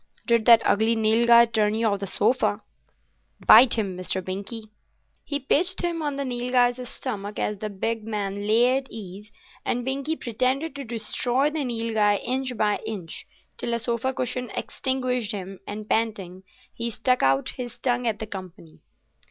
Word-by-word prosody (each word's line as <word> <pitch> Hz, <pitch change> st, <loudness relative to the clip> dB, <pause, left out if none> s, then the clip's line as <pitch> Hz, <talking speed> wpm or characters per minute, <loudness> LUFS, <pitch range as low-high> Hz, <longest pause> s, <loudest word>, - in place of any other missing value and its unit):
Did 235 Hz, -2 st, +2 dB
that 230 Hz, -1 st, +7 dB
ugly 220 Hz, +2 st, +3 dB
Nilghai 235 Hz, +2 st, +5 dB
turn 215 Hz, -1 st, +2 dB
you 225 Hz, +1 st, 0 dB
off 200 Hz, -2 st, +1 dB
the 200 Hz, -, -4 dB
sofa? 220 Hz, -1 st, +1 dB, 0.8 s
Bite 235 Hz, +3 st, +8 dB
him, 200 Hz, -5 st, -2 dB
Mr. 185 Hz, +1 st, -2 dB
Binkie." 200 Hz, +4 st, -6 dB, 0.5 s
He 285 Hz, -1 st, -3 dB
pitched 350 Hz, +8 st, +1 dB
him 340 Hz, -2 st, -1 dB
on 290 Hz, -2 st, -2 dB
the 280 Hz, 0 st, -3 dB
Nilghai's 245 Hz, 0 st, 0 dB
stomach, 210 Hz, -5 st, -5 dB
as 210 Hz, -1 st, -2 dB
the 215 Hz, -, -4 dB
big 220 Hz, +2 st, -3 dB
man 205 Hz, -1 st, -3 dB
lay 240 Hz, +4 st, +4 dB
at 270 Hz, -, -12 dB
ease, 205 Hz, 0 st, -9 dB, 0.3 s
and 245 Hz, 0 st, -2 dB
Binkie 275 Hz, +4 st, -1 dB
pretended 255 Hz, +6 st, -1 dB
to 280 Hz, -, -5 dB
destroy 245 Hz, +4 st, 0 dB
the 310 Hz, -2 st, -2 dB
Nilghai 225 Hz, -4 st, +1 dB
inch 255 Hz, -1 st, -2 dB
by 210 Hz, -1 st, +1 dB
inch, 205 Hz, -7 st, -6 dB, 0.3 s
till 235 Hz, -, -2 dB
a -, -, 0 dB
sofa 235 Hz, +2 st, -1 dB
cushion 250 Hz, -1 st, -3 dB
extinguished 250 Hz, -4 st, -2 dB
him, 195 Hz, -1 st, -6 dB
and 210 Hz, +1 st, -6 dB
panting 195 Hz, -5 st, -2 dB, 0.3 s
he 235 Hz, 0 st, -3 dB
stuck 250 Hz, +3 st, +1 dB
out 135 Hz, +1 st, +2 dB
his 245 Hz, -2 st, -7 dB
tongue 245 Hz, -1 st, 0 dB
at 220 Hz, -2 st, 0 dB
the 220 Hz, -, -5 dB
company. 185 Hz, -5 st, -10 dB
230 Hz, 165 wpm, -25 LUFS, 210-250 Hz, 0.8 s, Bite